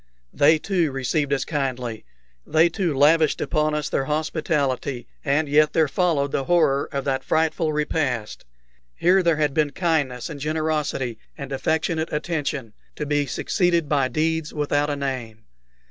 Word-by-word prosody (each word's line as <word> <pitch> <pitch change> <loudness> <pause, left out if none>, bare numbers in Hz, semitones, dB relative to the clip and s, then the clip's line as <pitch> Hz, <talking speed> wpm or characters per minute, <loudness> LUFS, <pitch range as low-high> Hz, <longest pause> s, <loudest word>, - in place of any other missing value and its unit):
They 155 +3 +5
too 170 -2 0
received 135 +2 -1
us 140 - 0
kindly, 125 -7 -3 0.4
they 160 - +3
too 165 -4 -1
lavished 155 +2 +4
upon 155 -1 0
us 150 -2 -2
their 135 - -1
hospitality, 150 -4 -1 0.2
and 150 +2 +1
yet 150 +1 +3
there 160 -2 +3
followed 145 -2 +1
the 135 - -1
horror 155 -5 +2
of 140 -1 -3
that 135 -1 -1
frightful 160 0 +1
repast. 150 -7 -2 0.5
Here 185 +2 +4
there 170 -2 +2
had 150 -2 0
been 150 -1 +2
kindness 145 -7 -1
and 150 -4 -7
generosity 150 -6 -2 0.2
and 140 -2 -7
affectionate 160 +3 -1
attention, 150 -7 -3 0.2
to 150 - -4
be 145 -1 0
succeeded 170 +3 0
by 140 -3 +2
deeds 160 +2 -1
without 145 0 0
a 145 - -1
name. 125 -6 -4
150 Hz, 150 wpm, -23 LUFS, 135-160 Hz, 0.5 s, They